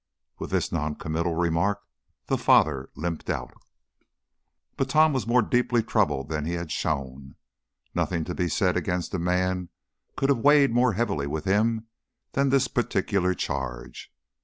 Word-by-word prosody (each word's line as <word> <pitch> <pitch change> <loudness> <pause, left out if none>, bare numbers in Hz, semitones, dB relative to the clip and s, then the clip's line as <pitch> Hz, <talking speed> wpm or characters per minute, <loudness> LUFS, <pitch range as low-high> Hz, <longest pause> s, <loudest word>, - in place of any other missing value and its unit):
With - - -5
this - - 0
noncommittal 80 +2 -2
remark 90 +5 0 0.4
the - - 0
father 70 -4 +3
limped 85 0 -4
out. - - -3 1.2
But 135 -1 -1
Tom 155 +1 +4
was 130 -4 -2
more 120 0 +4
deeply 120 0 +1
troubled 75 - 0
than 75 -1 -3
he 85 +3 -3
had 85 -2 -4
shown. 70 -3 -3 0.6
Nothing 85 -3 -1
to 90 - -5
be 90 -1 -1
said - - +1
against 90 +1 -2
a 95 - -1
man 90 +1 0 0.5
could 135 - +1
have 135 -4 +3
weighed 145 +1 +5
more 120 -1 +3
heavily 90 -10 -1
with 75 +2 -4
him 110 +3 +1 0.5
than 140 0 +1
this 135 -1 +3
particular 95 -5 0
charge. 65 -6 -5
90 Hz, 150 wpm, -26 LUFS, 80-120 Hz, 1.2 s, weighed